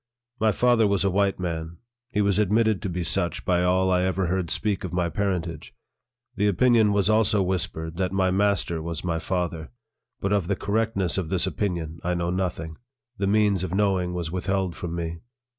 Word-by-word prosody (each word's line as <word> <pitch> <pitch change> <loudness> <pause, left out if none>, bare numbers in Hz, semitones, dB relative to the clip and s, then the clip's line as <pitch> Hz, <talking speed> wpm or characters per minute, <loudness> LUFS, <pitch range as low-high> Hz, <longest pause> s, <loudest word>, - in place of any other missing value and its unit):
My 110 0 +3
father 120 0 +3
was 100 -1 +1
a 100 - +2
white 100 0 +1
man. 85 -2 -4 0.3
He 105 - 0
was 100 0 +2
admitted 105 0 +2
to 100 - -3
be 90 0 -2
such - - -1
by 90 -1 +2
all 95 +1 +2
I 90 0 +3
ever 95 +1 0
heard 90 -1 -1
speak 105 -3 -1
of 90 - -4
my 90 -1 0
parentage. 90 -5 -3 0.6
The 105 +1 +2
opinion 110 +2 +4
was 100 -1 +2
also 110 -2 +3
whispered 85 -3 -2
that 90 -1 0
my 95 -1 +1
master 95 -4 +1
was 80 -1 -4
my 85 -2 -1
father; 85 -2 -3 0.5
but 100 +1 0
of 100 -4 +1
the 100 - +1
correctness 100 -3 0
of 85 -4 -4
this 95 -1 +1
opinion, 85 -5 -3
I 90 0 0
know 85 0 -1
nothing; 85 -3 -3 0.4
the 100 - 0
means 100 -2 +2
of 95 0 -3
knowing 95 -3 +1
was 85 -2 -3
withheld 95 0 -1
from 85 -3 -5
me. 85 -1 -4
95 Hz, 195 wpm, -25 LUFS, 85-100 Hz, 0.6 s, opinion